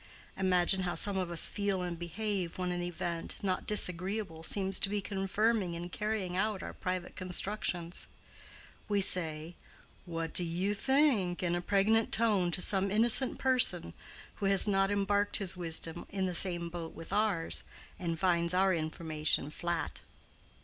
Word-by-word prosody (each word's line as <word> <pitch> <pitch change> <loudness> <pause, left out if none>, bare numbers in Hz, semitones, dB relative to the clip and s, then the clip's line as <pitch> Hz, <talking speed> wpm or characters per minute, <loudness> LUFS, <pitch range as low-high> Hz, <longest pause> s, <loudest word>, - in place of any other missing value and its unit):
Imagine 185 0 +2
how 175 -1 -2
some 205 -1 +2
of 185 -2 -2
us 170 -2 +4
feel 200 -3 -2
and 175 -2 -5
behave 185 0 -3
when 180 -1 -2
an 175 0 -3
event, 175 -1 -4
not 185 -2 -2
disagreeable 185 -3 0
seems 190 +3 +2
to - - +3
be 205 0 -1
confirming 195 -1 -1
and 175 +1 -6
carrying 210 -4 -3
out 205 +1 -1
our - - -7
private 185 -1 -4
constructions. 180 -2 -3 0.8
We 205 -1 +2
say, 160 -3 +1 0.5
"What 165 -1 -4
do 180 - +3
you 175 +4 -1
think?" 230 -7 +1
in 175 -1 0
a 175 - -1
pregnant 210 +4 +2
tone 210 -6 +2
to 180 - -3
some 195 0 +2
innocent 230 +5 +4
person 260 -1 +1 0.4
who 200 - -1
has 195 +2 +7
not 195 -1 +2
embarked 205 0 +1
his 195 -3 +2
wisdom 165 -1 -2
in 195 -1 -2
the 180 - -2
same 175 -1 +1
boat 165 -1 -7
with 165 - -9
ours, 205 -6 +1 0.4
and 170 -2 -3
finds 170 0 +1
our 190 0 +3
information 155 -2 -2
flat. 170 0 -3
185 Hz, 155 wpm, -31 LUFS, 170-205 Hz, 0.8 s, has